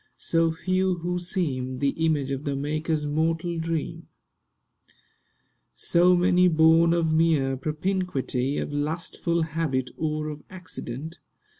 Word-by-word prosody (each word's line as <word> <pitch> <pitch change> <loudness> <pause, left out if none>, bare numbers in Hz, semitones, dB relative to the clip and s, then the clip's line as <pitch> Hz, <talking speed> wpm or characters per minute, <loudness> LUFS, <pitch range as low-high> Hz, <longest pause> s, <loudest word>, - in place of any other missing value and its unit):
So 165 -1 +1
few 185 +3 0
who 175 +1 -2
seem 135 -8 -2
The 140 +1 +1
image 150 -3 0
of 135 +1 -3
the 140 -2 -2
Maker's 150 +2 -1
mortal 165 +3 -1
dream; 165 -1 -3 1.7
So 180 +1 +4
many 180 0 +4
born 165 0 +5
of 165 -2 +1
mere 155 -5 +2
propinquity— 150 -3 -2
Of - - -3
lustful 165 +3 -1
habit, 155 -5 -2
or 155 -1 -2
of 150 -1 -7
accident. 165 -4 -8
160 Hz, 120 wpm, -25 LUFS, 145-170 Hz, 1.7 s, born